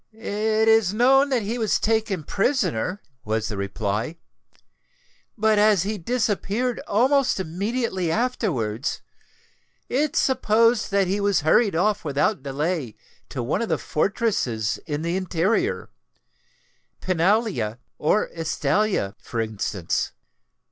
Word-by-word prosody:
"It 220 0 0
is 220 -3 +4
known 270 +4 +4
that 250 -5 +1
he 230 +4 -3
was 220 -3 +1
taken 220 -6 0
prisoner," 195 - -1 0.2
was 110 0 -1
the 105 - -4
reply; 105 - -2 1.2
"but 215 -1 +3
as 210 -4 +4
he 210 +1 -3
disappeared 230 +3 -1
almost 260 +3 +2
immediately 190 +1 -2
afterwards, 160 - -1 0.9
it 290 +3 0
is - - +4
supposed 230 -2 +2
that 200 -1 +2
he 195 +3 -1
was 200 -4 +2
hurried 195 +6 +3
off 205 +4 +1
without 150 +4 0
delay 145 - -2 0.3
to 130 - -4
one 150 - -1
of 230 - -2
the 160 - +1
fortresses 150 - -1
in 150 0 -3
the 170 +1 -1
interior—Pinalla 185 - -2 0.2
or 185 +8 +2
Estella, 165 - 0
for 115 - -5
instance. 105 -5 -2
195 Hz, 115 wpm, -24 LUFS, 150-225 Hz, 1.2 s, is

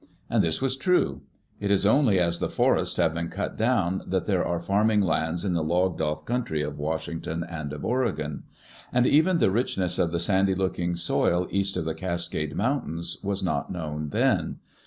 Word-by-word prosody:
And - - +3
this 80 +8 -1
was 130 -1 +1
true. 135 - +1 0.4
It 100 - -2
is 100 0 +3
only 110 -3 +4
as 85 -1 +1
the - - -1
forests - - +2
have 85 -3 +2
been 85 0 -3
cut - - -4
down 100 -6 +1
that 95 -1 0
there 95 -4 +1
are 85 -1 -1
farming 105 +4 +2
lands 85 0 0
in 95 - 0
the 85 -2 0
logged 90 +2 +1
off 75 -1 -2
country 115 -11 -1
of 75 0 -5
Washington 80 +2 -3
and 80 -4 -6
of 75 -1 -6
Oregon. 100 - -1 0.5
And 125 0 +3
even 160 +7 +4
the 95 - +3
richness 95 -5 0
of 85 - +2
the 85 - -1
sandy 95 +1 +2
looking 90 -2 -1
soil 85 +1 +1
east 100 -1 0
of 80 - -2
the 80 - -1
Cascade 85 -3 -3
Mountains 85 - -2
was 100 -1 -1
not 90 - -1
known 75 -3 -4
then. - - +1
90 Hz, 190 wpm, -26 LUFS, 80-100 Hz, 0.5 s, only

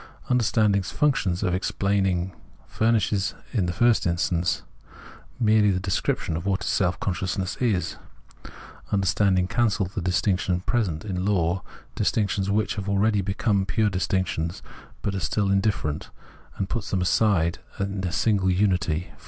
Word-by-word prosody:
Understanding's 105 -5 +2
function 135 -11 +1
of 90 - +1
explaining 95 -1 0 0.3
furnishes 110 -3 +1 0.2
in 100 -8 +1
the - - 0
first 120 +2 +3
instance 85 +1 0 0.8
merely 110 -3 +4
the 95 -2 +1
description 90 -3 -1
of 80 - -3
what 95 -1 0
self 90 -2 0
consciousness 95 0 -2
is. 110 -8 0 0.9
Understand 95 0 +2
ing 90 0 +1
cancels 105 -4 0
the 105 - -3
distinctions 90 0 0
present 105 -8 -1
in 90 -3 -2
Law, 95 -2 +1 0.3
distinc 105 -2 +1
tions 100 -1 -1
which 105 +2 0
have 100 - -3
aheady 100 0 +2
become 100 +1 +1
pure 105 +2 +1
distinctions 90 -2 -1 0.4
but 100 - -1
are 95 - -2
still 100 +1 0
indifferent, 95 -7 0 0.5
and 95 - -2
puts 115 -1 -3
them 95 - 0
inside 90 -3 +2 0.2
a 100 -2 -2
single 100 -1 +2
unity. 90 -3 +1
95 Hz, 135 wpm, -25 LUFS, 90-105 Hz, 0.9 s, merely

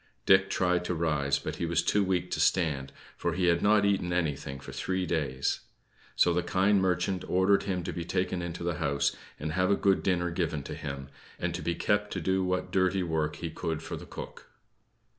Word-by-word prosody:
Dick 95 0 +5
tried 90 -1 +1
to 90 - -1
rise, 75 -4 +1
but 70 - -5
was 85 -1 +1
too 105 - +2
weak 90 -2 -1
to - - -1
stand, 70 -7 +1 0.2
for 85 - -1
he 90 +2 0
had 85 -1 +3
not 105 0 +4
eaten 95 -3 +1
anything 75 -5 -2
for - - -9
three 95 -1 -2
days. 70 -6 -1 0.6
So 85 - +4
the 90 - +2
kind 95 +3 +2
merchant 95 0 0
ordered 95 +2 +3
him 90 -2 -1
to 90 0 -4
be 85 - -4
taken 90 +1 -1
into 85 0 -5
the 85 0 -2
house, 70 -2 +1 0.2
and 75 0 -3
have 95 +3 +1
a 100 - +5
good 100 -1 +2
dinner 90 -2 +1
given 80 -4 -1
to - - -6
him; 70 -1 -6 0.3
and 85 -1 -2
to 85 - -4
be 85 +3 -1
kept 105 +3 0
to 95 - -2
do 95 +3 +1
what 90 0 -1
dirty 95 0 +2
work 80 -3 -1
he - - -5
could 80 -1 -3
for - - -5
the - - -9
cook. - - -9
90 Hz, 210 wpm, -29 LUFS, 80-95 Hz, 0.6 s, Dick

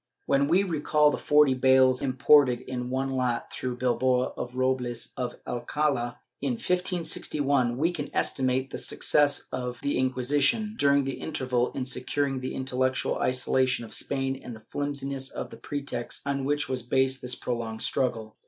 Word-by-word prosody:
* - - -49
When 140 0 +2
we 180 +5 +4
recall 150 -4 +2
the - - -3
forty 150 -2 +4
bales 130 0 +4
imported 130 -1 +4
m 125 -1 -4
one 135 +1 -1
lot 125 -2 -1
through 125 -1 -4
Bilbao 125 0 +1
for - - -4
Robles 125 -2 -1
of 125 -1 -3
Alcala, 120 0 -1 0.2
in 135 -2 0
1561, 145 -6 0
we 165 +5 +2
can 145 -4 -4
esti - - -1
mate 130 +1 0
the - - -4
success 145 -1 +2
of 125 -1 -4
the 140 - 0
Inquisition, 135 - +1
during 140 -7 +3
the 135 0 -4
interval, 130 -5 -1
in 130 - -3
securing 130 +2 -1
the 130 - -5
intellectual 130 0 -1
isolation 130 -1 +1
of - - -7
Spain 135 -1 -1
and 120 - -7
the 110 0 -15
flimsiness 140 -2 -1
of - - -6
the - - -10
pretext 140 -4 -4
on 140 -1 -1
which 145 +2 0
was 130 -1 -2
based 130 +2 +1
this 125 - -1
prolonged 115 -2 -3
struggle. 115 -4 -1
130 Hz, 165 wpm, -27 LUFS, 125-140 Hz, 0.2 s, we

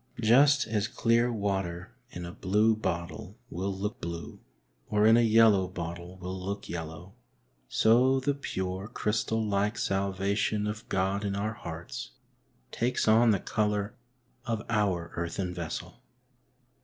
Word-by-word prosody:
Just 135 +5 +5
as 110 -2 0
clear 120 +2 +2
water 95 -5 -2 0.2
in 90 0 -7
a 85 - -6
blue 105 +5 +2
bottle 90 0 -4
will 95 +3 -2
look 100 +2 -4
blue, 85 -3 -6 0.5
or 105 0 +3
in 110 +1 +7
a 120 - +5
yellow 110 -4 +5
bottle 85 0 -6
will 90 0 -6
look 100 +2 -4
yellow, 85 +2 -7 0.6
so 125 +4 +4
the 145 +2 +1
pure, 95 -8 -4
crystal 110 -1 -1
like 105 +2 0
salvation 100 +2 0
of 105 +2 -5
God 95 +2 0
in 100 -1 -1
our 105 +2 -1
hearts 85 -5 -7 0.6
takes 120 0 0
on 115 +2 +6
the 100 -3 +3
colour 105 0 -1 0.5
of 115 -4 -2
our 95 -6 0
earthen 90 +2 -3
vessel. 85 -3 -6
100 Hz, 135 wpm, -29 LUFS, 90-110 Hz, 0.6 s, in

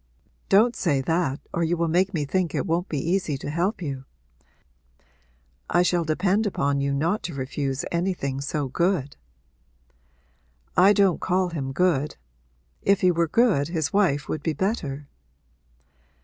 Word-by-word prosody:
'Don't 225 +5 +5
say 145 -6 +1
that 150 -1 0
or 170 - 0
you 170 +1 0
will 170 0 +1
make 180 +4 +2
me 150 -4 -1
think 180 +3 -1
it - - -1
won't 175 +1 -1
be 150 - -2
easy 170 0 -1
to 145 - -5
help 180 +5 -1
you. 135 -3 -5 1.6
I 175 - +3
shall 175 -1 +1
depend 190 +7 +1
upon 140 -7 0
you 140 0 0
not 165 +9 0
to 165 - -7
refuse 135 0 -3
anything 170 -6 -1
so 140 0 -2
good.' 165 0 0 1.6
'I 195 +3 +6
don't 195 -4 +2
call 185 0 +1
him 140 -6 -4
good. 150 -2 +1 0.6
If 200 0 +2
he 185 - +5
were 170 -1 +1
good 205 - +2
his 160 -3 -2
wife 145 -9 +2
would 155 - -3
be 160 - -1
better.' 150 - -3
170 Hz, 150 wpm, -24 LUFS, 140-185 Hz, 1.6 s, I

